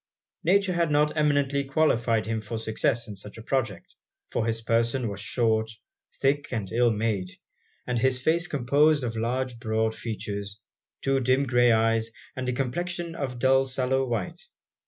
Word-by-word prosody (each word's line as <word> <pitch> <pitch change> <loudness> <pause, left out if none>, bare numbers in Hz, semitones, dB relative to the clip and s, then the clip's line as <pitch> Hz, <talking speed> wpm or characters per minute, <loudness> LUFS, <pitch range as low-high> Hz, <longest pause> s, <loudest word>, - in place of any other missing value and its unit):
Nature 190 +2 +3
had 170 -2 +1
not 150 +1 +2
eminently 145 -2 +2
qualified 120 -6 +1
him 110 0 -2
for 110 +2 -5
success 115 +2 -1
in 105 - -7
such 100 +3 -9
a - - -8
project; 110 -9 -2 0.4
for 115 - 0
his 115 0 -1
person 115 +2 +1
was 100 -1 -5
short, 110 0 +1 0.5
thick, 145 +2 +1
and 105 -6 -3
ill 120 +1 +3
made, 105 -4 -1 0.6
and 125 -2 -1
his 130 +1 +2
face 165 +6 +1
composed 145 +2 +3
of 115 -2 -3
large 120 +2 -2
broad 110 -1 0
features, 105 -2 -5 0.4
two 135 0 +2
dim 130 +2 +2
grey 120 -1 +4
eyes, 115 0 +2 0.3
and 130 -1 -3
a - - 0
complexion 170 +7 -3
of 140 -6 -3
a - - -10
dull 130 +2 +4
sallow 130 0 0
white. 115 -7 -4
120 Hz, 165 wpm, -26 LUFS, 110-135 Hz, 0.6 s, grey